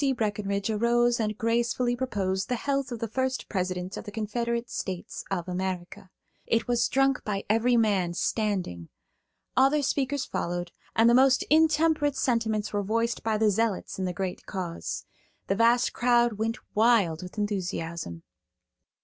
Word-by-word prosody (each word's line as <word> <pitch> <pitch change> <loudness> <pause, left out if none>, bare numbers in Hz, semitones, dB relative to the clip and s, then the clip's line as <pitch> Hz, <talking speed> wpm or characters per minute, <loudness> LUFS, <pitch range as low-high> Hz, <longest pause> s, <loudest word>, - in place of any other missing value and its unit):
Breckenridge 205 -1 -1
arose 240 +2 +2
and 215 -1 -1
gracefully 240 +1 +1
proposed 195 -7 -2
the 250 - +1
health 275 +1 -1
of 240 - -3
the 230 - -3
first 260 +3 -2
President 185 -1 -3
of - - -6
the 205 - -8
Confederate 235 +2 -2
States 185 -5 -5
of 185 -2 -2
America. 185 0 -4 0.4
It 230 - +1
was 240 -1 +2
drunk 270 0 +2
by 200 -2 -2
every 240 +2 +3
man, 195 -6 +2
standing. 185 - -1 0.7
Other 275 +3 +4
speakers 275 0 0
followed, 175 0 -3 0.2
and 225 +1 +5
the 235 - +6
most 260 +1 +5
intemperate 310 -2 +3
sentiments 225 -5 0
were 205 - +1
voiced 230 +3 -1
by 220 -1 0
the 215 -1 +3
zealots 220 -2 -1
in 190 - -1
the 180 - -1
great 185 0 -4
cause. 180 -3 -4 0.4
The 195 - 0
vast 235 +3 +3
crowd 240 -1 +3
went 225 +2 -1 0.2
wild 210 -8 +3
with 180 +3 -9
enthusiasm. 170 - -3
220 Hz, 150 wpm, -27 LUFS, 190-240 Hz, 0.7 s, the